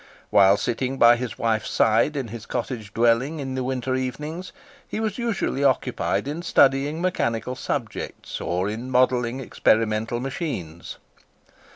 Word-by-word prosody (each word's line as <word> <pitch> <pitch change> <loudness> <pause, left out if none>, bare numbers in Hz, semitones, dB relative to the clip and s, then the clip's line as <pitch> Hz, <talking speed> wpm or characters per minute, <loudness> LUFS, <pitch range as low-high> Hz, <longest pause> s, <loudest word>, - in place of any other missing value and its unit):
While 100 0 +6
sitting 130 +5 -2
by 120 -1 +7
his 120 -1 -5
wife's 110 -1 0
side 115 +7 +3
in 130 -5 -3
his 115 0 -8
cottage 110 -6 -4
dwelling 120 +8 +2
in 135 -2 -4
the 130 0 -2
winter 130 0 -2
evenings, 150 +7 -4 0.4
he - - -4
was 220 0 -2
usually 225 - -1
occupied 135 0 +1
in 150 +4 -3
studying 145 0 +3
mechanical 125 -9 -1
subjects, 130 -2 -5
or 90 +2 -1
in 115 +5 -4
modelling 125 -1 +2
experimental 110 -2 +1
machines. 125 - -5
125 Hz, 140 wpm, -24 LUFS, 115-140 Hz, 0.4 s, by